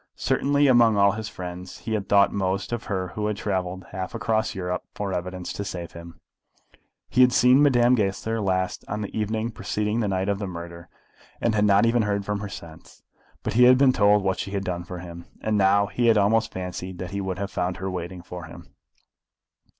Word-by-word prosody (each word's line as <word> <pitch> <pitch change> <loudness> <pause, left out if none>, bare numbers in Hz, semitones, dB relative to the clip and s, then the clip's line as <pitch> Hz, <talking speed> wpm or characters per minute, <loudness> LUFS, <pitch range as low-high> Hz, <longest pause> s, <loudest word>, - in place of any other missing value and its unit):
Certainly 145 +1 +2
among 120 -5 +5
all 100 0 +5
his 110 +1 -5
friends 90 0 -8
he 110 - -4
had 105 -2 -2
thought 100 -1 +5
most 95 +1 -1
of 120 - -4
her 95 -2 -2
who 105 +3 -3
had 105 -1 -2
travelled 95 -2 -3
half 95 0 -5
across 110 -1 0
Europe 90 -1 -3
for 100 -2 -3
evidence 90 0 -4
to 100 - -4
save 90 -3 -6
him. 85 0 -11 0.9
He 125 - +2
had 125 0 +6
seen 125 +3 +5
Madame 125 -4 +4
Goesler 110 0 0
last 95 -2 -1
on 105 +1 -3
the 105 - -6
evening 110 +2 -1
preceding 105 0 -2
the 110 - 0
night 95 0 -1
of 100 -1 0
the 100 - -3
murder, 85 -1 -8 0.5
and 115 - +1
had 105 -1 +2
not 100 +2 +5
even 115 +1 +3
heard 100 -1 -1
from 105 0 -2
her 105 0 -5
since. 80 -5 -12 0.4
But - - -2
he 125 +3 +6
had 125 0 +7
been 135 -1 +5
told 105 -2 +4
what 95 -1 0
she - - -3
had 100 -1 -3
done 90 -2 -4
for 90 +1 -7
him, 85 -1 -9
and 110 -1 -1
now 100 0 +4
he 120 +4 0
had 115 -2 +5
almost 110 +2 +2
fancied 90 0 -6
that 90 +2 -6
he 100 0 -3
would 95 -1 -3
have 100 0 -4
found 90 0 -2
her 95 0 -4
waiting 90 0 -6
for 90 -2 -8
him. 85 +1 -13
100 Hz, 215 wpm, -25 LUFS, 90-110 Hz, 0.9 s, had